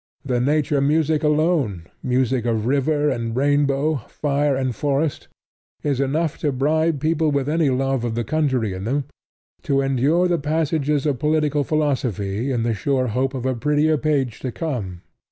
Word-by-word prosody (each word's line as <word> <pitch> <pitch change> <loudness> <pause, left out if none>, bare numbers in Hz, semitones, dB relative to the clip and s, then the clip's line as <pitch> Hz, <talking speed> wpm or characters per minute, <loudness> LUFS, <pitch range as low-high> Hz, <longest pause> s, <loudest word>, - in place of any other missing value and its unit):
The 125 -3 0
nature 145 +1 +1
music 155 +1 +2
alone 150 - +1 0.2
music 125 -1 +1
of 115 -2 0
river 145 +3 +1
and 115 -2 -3
rainbow, 145 +2 +2
fire 145 -1 0
and 130 -3 -1
forest 145 +4 -1 0.6
is 140 -3 0
enough 150 +3 0
to 150 - 0
bribe 155 +3 +1
people 160 +1 +1
with 140 -2 0
any 155 -1 +2
love 135 -1 0
of 115 -2 -2
the 120 - -1
country 130 -8 0
in 95 +1 -6
them 140 +5 0 0.6
to 135 -1 +1
endure 135 +7 +2
the 175 -2 +1
passages 150 -1 0
of 140 -5 0
political 150 0 +1
philosophy 125 - -1
in 120 -3 0
the 115 -1 0
sure 130 +1 0
hope 130 +4 -1
of 130 -1 -4
a 130 - +1
prettier 150 +5 +2
page 135 -6 0
to 130 - -4
come. 105 - -4
140 Hz, 165 wpm, -22 LUFS, 125-150 Hz, 0.6 s, music